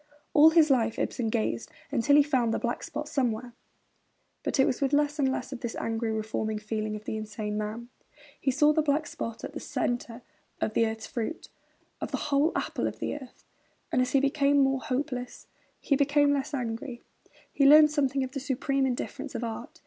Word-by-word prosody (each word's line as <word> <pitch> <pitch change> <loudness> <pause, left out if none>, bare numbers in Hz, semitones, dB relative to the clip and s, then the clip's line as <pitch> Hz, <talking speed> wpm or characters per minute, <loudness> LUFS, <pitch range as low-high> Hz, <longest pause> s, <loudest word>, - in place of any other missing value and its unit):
All 305 +1 +8
his 320 -2 +5
life 230 -4 +2
Ibsen 230 -3 -1
gazed 120 - -1 0.2
until 285 +2 +3
he 295 - +7
found 255 -6 +1
the - - 0
black 240 0 -2
spot 300 -2 -5
somewhere; 245 -4 -1 0.9
but - - -2
it 265 - +6
was 255 - -1
with 275 0 +1
less 295 +1 +2
and 265 -2 +3
less 265 - -4
of 255 - -6
this 235 -1 -4
angry, 225 0 -2
reforming 220 0 -2
feeling 215 0 -3
of 215 - -9
the - - -3
insane 210 -1 -4
man. 215 +3 -4 0.5
He 275 - 0
saw 295 +3 +4
the 315 - +3
black 300 +1 +1
spot 230 -5 -6
at - - -6
the - - -5 0.5
core 235 +1 -11 0.4
of 215 - -1
the 230 - +3
earth's 220 0 -5
fruit, 245 +6 -5 0.5
of - - -3
the - - -2
whole 285 +4 +3
apple - - -1
of - - -5
the - - -3
earth; 265 -4 -10 0.5
and 255 - +3
as 255 - -1
he 275 - +5
became 280 +1 +2
more 270 -1 +3
hopeless, 250 0 -3 0.3
he 280 - +1
became 290 +1 +3
less 285 +1 -2
angry; 235 0 -4 0.5
he 275 - +4
learned 300 +1 +8
something 275 -2 +1
of 260 - -5
the 275 - -4
supreme 270 0 0
indifference 265 +2 -4
of 235 - -3
art. 225 -1 -6
260 Hz, 200 wpm, -28 LUFS, 225-285 Hz, 0.9 s, All